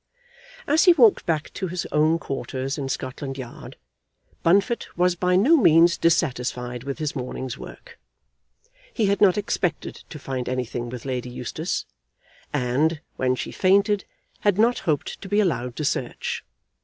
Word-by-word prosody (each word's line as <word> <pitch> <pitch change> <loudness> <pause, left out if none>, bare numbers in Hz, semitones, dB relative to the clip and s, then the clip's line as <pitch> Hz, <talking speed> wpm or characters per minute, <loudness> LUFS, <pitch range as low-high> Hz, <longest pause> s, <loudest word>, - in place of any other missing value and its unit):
As 305 +2 +3
he 355 - +8
walked 235 -12 +4
back 160 -2 -1
to 190 - -3
his 175 0 -4
own 155 +2 +3
quarters 135 -1 -4
in 135 -1 -3
Scotland 135 +1 -4
Yard, 125 -3 -9 0.7
Bunfit 200 +7 +2
was 180 0 +3
by 180 +1 +1
no 245 - +5
means 170 - +6
dissatisfied 125 -6 0
with 140 -1 -4
his 155 -2 -3
morning's 130 -1 -4
work. - - -12 0.9
He 225 - 0
had 200 +1 +1
not 195 -2 +5
expected 195 -6 -2
to 155 - -8
find 130 -3 -4
anything 125 -1 -3
with 125 0 -8
Lady 125 -2 -3
Eustace, 125 - -4 0.7
and, 145 +4 +1 0.2
when 130 -1 +1
she - - -5
fainted, 200 +2 +2 0.3
had 205 -2 +2
not 235 +3 +3
hoped 150 -2 -1
to 195 - -8
be 205 - +2
allowed 125 - 0
to 150 - -3
search. - - -2
155 Hz, 155 wpm, -24 LUFS, 130-195 Hz, 0.9 s, he